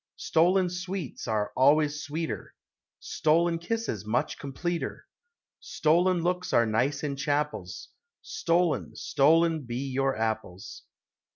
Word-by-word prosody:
Stolen 180 +3 +3
sweets 185 -6 -5
are 105 -2 -1
always 150 +2 +3
sweeter; 160 +3 -5 0.4
Stolen 165 +2 +1
kisses 175 - -3
much 110 +4 -1
completer; 165 +5 -4 0.5
Stolen 175 +3 +1
looks 180 +1 -1
are 115 - +5
nice 130 +7 0
in 145 -2 -2
chapels; 140 -11 -2 0.3
Stolen, 170 -1 0
stolen 160 +3 +3
be 125 +3 -4
your 135 -1 0
apples. 110 -3 -4
150 Hz, 105 wpm, -27 LUFS, 130-170 Hz, 0.5 s, are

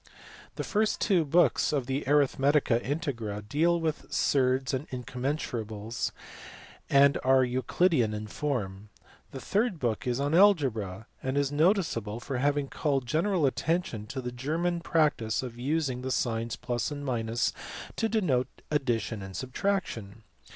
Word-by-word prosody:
The - - -3
first 215 0 +1
two 185 -5 +3
books 165 +4 +3
of 140 -4 0
the 135 +3 -2
Arithmetica 140 -3 +3
Integra 115 - -3
deal 170 +8 +2
with 160 -2 -3
surds 130 -1 +2
and 130 +3 -2
incommensurables, 120 -4 -3 0.8
and 140 0 +5
are 130 0 +5
Euclidean 130 +1 +2
in 105 0 -4
form. 105 -5 -3 0.4
The 135 - -7
third 210 - 0
book 120 -4 -2
is 125 +1 0
on 145 +2 0
algebra, 130 - +3 0.2
and 130 +1 -2
is 140 -1 +1
noticeable 145 - +1
for 130 +1 -4
having 145 +1 +1
called 135 -3 -1
general 165 +4 +1
attention 135 -6 -1
to 130 +4 -4
the 125 0 -4
German 160 +8 -1
practice 150 -10 +1
of 120 -2 -7
using 135 -1 -1
the 130 - -3
signs 115 -2 -1 0.2
+ 120 - -1
and 120 -5 -1 0.4
to 225 - 0
denote 145 - +1 0.2
addition 120 -7 0
and 95 -1 -7
subtraction. 125 - -2
135 Hz, 135 wpm, -29 LUFS, 115-155 Hz, 0.8 s, and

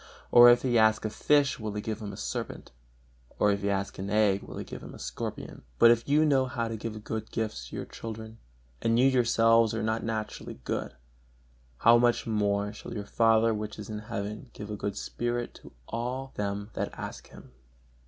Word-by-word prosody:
or 120 0 +10
if 120 0 +5
he 120 -3 +3
ask 110 0 +3
a 110 - -2
fish, 145 0 +2
will 110 -2 -4
he 105 - -3
give 110 +1 -4
him 105 -1 -5
a 100 - -9
serpent? 105 - -5 0.7
or 105 - +4
if 100 0 -1
he 100 - 0
ask 100 -1 -2
an 95 +1 -4
egg, 105 -2 +3
will - - -9
he - - -4
give - - -9
him - - -10
a - - -10
scorpion? 65 -1 -6 0.2
But 115 - +8
if 120 +3 +1
you 150 +2 +4
know 135 -3 +3
how 115 -2 -2
to 115 - -3
give 110 -1 -6
good 110 0 -4
gifts 105 - -3
to - - -8
your - - -4
children, 110 0 -8 0.4
and 115 0 +2
you 125 - +5
yourselves 115 -3 +4
are 110 - -2
not 110 +1 -1
naturally 110 -10 -4
good, - - -3 0.8
how 115 - +6
much 120 0 +2
more 105 -2 0
shall 105 - -8
your 105 -2 -4
Father 115 +1 +3
which 105 0 -5
is 105 0 -7
in 105 - -4
heaven 105 +3 -5
give 105 0 -8
a - - -3
good 100 -1 -4
spirit 120 +2 -3
to - - -13 0.2
all 125 +3 -4
them 100 +1 -3
that - - -2
ask - - -7
Him!" - - -15
110 Hz, 210 wpm, -28 LUFS, 105-115 Hz, 0.8 s, or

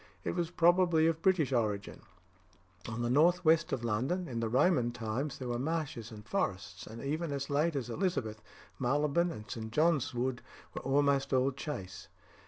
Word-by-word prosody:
It - - -1
was 170 -2 -1
probably 175 -1 +4
of 165 0 +1
British 165 -8 +2
origin. 105 -4 -1 0.9
On 115 +2 -3
the 120 - 0
north 175 +6 +4
west 160 +1 +4
of 120 - -2
London, 130 +12 -1
in 120 -3 -4
the 115 -1 -1
Roman 130 0 +3
times, 120 +4 -3
there 130 - -6
were 120 0 -1
marshes 140 -6 -3
and 105 -1 -10
forests, 95 -4 -3
and 115 +3 -8
even 155 +3 -2
as 140 0 -3
late 150 +3 +1
as 130 -4 -2
Elizabeth, 115 - -2 0.4
Marylebone 145 +6 +1
and 110 -10 -7
St. 110 -1 -6
John's 155 0 +2
Wood 125 0 -2 0.3
were - - -5
almost 140 0 +2
all 130 +1 +3
chase. 95 - -6
135 Hz, 175 wpm, -32 LUFS, 115-160 Hz, 0.9 s, probably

